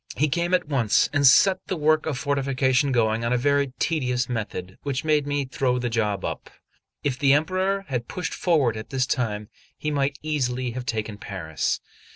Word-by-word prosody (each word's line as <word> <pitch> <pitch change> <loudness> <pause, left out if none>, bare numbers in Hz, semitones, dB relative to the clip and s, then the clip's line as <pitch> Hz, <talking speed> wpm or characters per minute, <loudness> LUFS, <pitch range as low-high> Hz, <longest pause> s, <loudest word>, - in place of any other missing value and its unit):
He 150 - +2
came 175 +4 +1
at 180 -4 -1
once, 125 -8 +2
and 140 -1 +5
set 185 +8 +5
the 185 - -2
work 155 +1 +2
of 145 -5 -1
fortification 135 0 +1
going 115 -2 +1
on 115 - 0
a 125 - +3
very 140 +1 +1
tedious 125 -6 0
method, 105 -6 -5
which 135 -2 -2
made 150 -2 +2
me 145 -1 -1
throw 125 0 0
the 120 -1 -2
job 105 -4 0
up. - - -5 0.5
If 130 -3 -1
the 140 0 +5
Emperor 185 +6 +1
had 125 -4 -3
pushed 180 -2 -4
forward 145 - +2
at 110 0 -7
this 130 -1 0
time, 105 -5 -2 0.3
he 150 - -2
might 140 -1 0
easily 130 -5 -1
have 125 +1 -6
taken 110 -2 -3
Paris. 80 -9 -3
130 Hz, 190 wpm, -24 LUFS, 120-150 Hz, 0.5 s, and